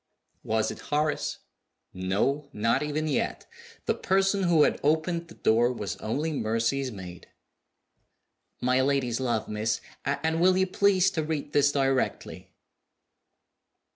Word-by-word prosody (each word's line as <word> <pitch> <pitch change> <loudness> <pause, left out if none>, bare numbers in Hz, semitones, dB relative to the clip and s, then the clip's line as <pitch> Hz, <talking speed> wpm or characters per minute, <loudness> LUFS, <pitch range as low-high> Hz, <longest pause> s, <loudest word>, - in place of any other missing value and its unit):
Was 110 0 0
it - - -9
Horace? 150 0 0 0.6
No 105 +11 -1
not 115 +2 +1
even 150 +1 -2
yet. 145 - -1 0.4
The - - +2
person 195 +1 +1
who 170 -4 +4
had - - +1
opened 160 +3 0
the 165 - -14
door 120 +2 +3
was 105 -5 -4
only 145 +9 -2
Mercy's 120 +2 0
maid. 90 -4 -10 1.3
"My 125 +1 +2
lady's 130 -3 0
love, 120 -4 -1
miss; 110 +1 -1 0.2
and 160 +4 -1
will 185 +1 +5
you 190 - +3
please 190 0 +3
to 160 - -1
read 150 -2 -4
this 145 0 +4
directly?" 135 -2 -1
140 Hz, 130 wpm, -27 LUFS, 115-160 Hz, 1.3 s, will